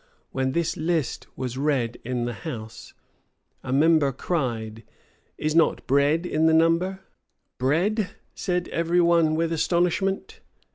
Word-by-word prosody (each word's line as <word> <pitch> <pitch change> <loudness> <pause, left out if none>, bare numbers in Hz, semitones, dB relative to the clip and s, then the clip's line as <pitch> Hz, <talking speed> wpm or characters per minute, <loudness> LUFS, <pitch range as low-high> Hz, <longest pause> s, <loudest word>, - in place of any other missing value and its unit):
[] - - -41
When 130 0 -1
this 170 -1 -1
list 160 -3 -1
was 130 0 -4
read 135 -5 0
in 125 0 -2
the 120 - -3
house, 115 -8 -8 0.7
a 130 - -5
member 150 0 +4
cried, 120 -7 -3 0.6
"Is 155 0 -1
not 165 0 +2
bread 145 +5 +2
in 160 -2 +2
the 160 - +4
number?" 170 +4 +2 0.6
"Bread," 180 - +1 0.2
said 180 -2 -2
every 170 +1 +1
one 170 -2 +4
with 165 +1 0
astonishment. 175 +4 0
160 Hz, 135 wpm, -25 LUFS, 130-170 Hz, 0.7 s, member